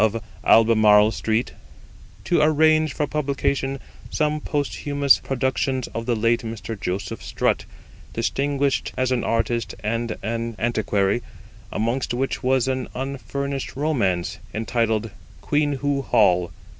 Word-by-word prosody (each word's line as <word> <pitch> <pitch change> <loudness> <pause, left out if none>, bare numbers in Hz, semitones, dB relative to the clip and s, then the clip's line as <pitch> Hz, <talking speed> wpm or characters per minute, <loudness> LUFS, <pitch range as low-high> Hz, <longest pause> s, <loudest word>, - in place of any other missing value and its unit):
of 110 +1 +2 0.2
Albemarle 110 -2 +6
Street, 110 +3 -1 0.7
to 155 +9 +2
arrange 155 0 +4
for 150 - -1
publication 140 -2 -1 0.3
some 150 -1 0
posthumous 145 -1 +1
productions 130 0 -1
of 115 +1 -5
the 120 - +2
late 115 +2 +2
Mr. 115 0 -5
Joseph 95 0 -4
Strutt, - - 0 0.5
distinguished 140 +4 0
as 130 0 +1
an 125 -2 +1
artist 115 0 -1
and 115 +1 -2
an 115 0 -3
antiquary, 105 -2 +1 0.5
amongst 120 +3 -1
which 135 +2 -2
was 130 -1 +2
an 130 -1 -1
unfinished 140 +1 -4
romance, 115 - 0 0.2
entitled 115 -1 0 0.3
Queenhoo 145 -1 0
Hall. 90 -6 +3
125 Hz, 115 wpm, -23 LUFS, 110-140 Hz, 0.7 s, Albemarle